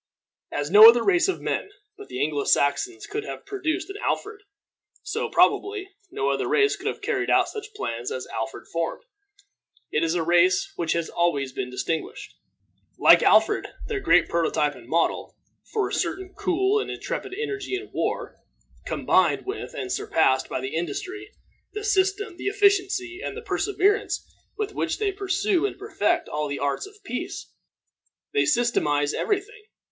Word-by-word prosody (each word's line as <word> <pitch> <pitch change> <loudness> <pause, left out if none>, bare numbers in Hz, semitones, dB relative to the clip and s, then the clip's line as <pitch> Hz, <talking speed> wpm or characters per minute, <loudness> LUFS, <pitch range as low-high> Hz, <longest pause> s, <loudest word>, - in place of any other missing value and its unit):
As 145 +2 -3
no 215 +3 +11
other 235 0 +4
race 365 -1 +3
of 380 - -2
men - - -2 0.3
but 415 0 -12
Anglo 145 -1 -1
Saxons 355 - +1
could 420 +1 -4
have - - -8
produced 375 -4 -2
an 400 - -7
Alfred, 420 -1 -2 0.6
so, - - -3
probably, 400 -1 +2 0.2
no 135 - -1
other 135 -1 -1
race 415 -1 +3
could - - -7
have - - -4
carried - - -1
out - - +4
such 430 -1 -8
plans 120 - -4
as 130 - -4
Alfred 135 0 -5
formed. 165 0 -3 0.9
It 155 - +1
is 165 +1 +1
a 170 - +1
race 175 +3 +3
which 165 -2 0
has 170 -1 -1
always 145 -7 0
been 125 - -4
distinguished, 125 +6 -4 0.6
like - - +7
Alfred - - +4 0.2
their 425 -3 -2
great 180 - +4
prototype 160 -3 +1
and 120 -3 -14
model, 165 +1 0 0.3
for 425 -2 0
a - - -7
certain 380 0 -2
cool 385 +3 +1
and - - -4
intrepid 395 -1 -5
energy 405 -3 -3
in 395 +2 -7
war, - - -3 0.5
combined - - +2
with 410 +5 -5
and 385 -6 -4
surpassed 390 - +1
by - - -2
the 130 +1 -5
industry, 365 - -4 0.4
the 425 - -5
system, 395 -2 +1
the - - -5
efficiency, 395 -2 +1
and 425 - -4
the 465 - -7
perseverance 410 -1 0 0.3
with 425 -1 -3
which - - -1
they 420 -2 0
pursue 390 0 0
and - - -8
perfect 415 +3 0
all 150 0 -2
the 140 0 -3
arts 140 - -2
of 415 0 -18
peace. 250 -10 -6 0.8
They 425 - +3
systematize 150 - +1
every 410 -3 +1
thing. 420 +1 -17
370 Hz, 165 wpm, -25 LUFS, -, 0.9 s, no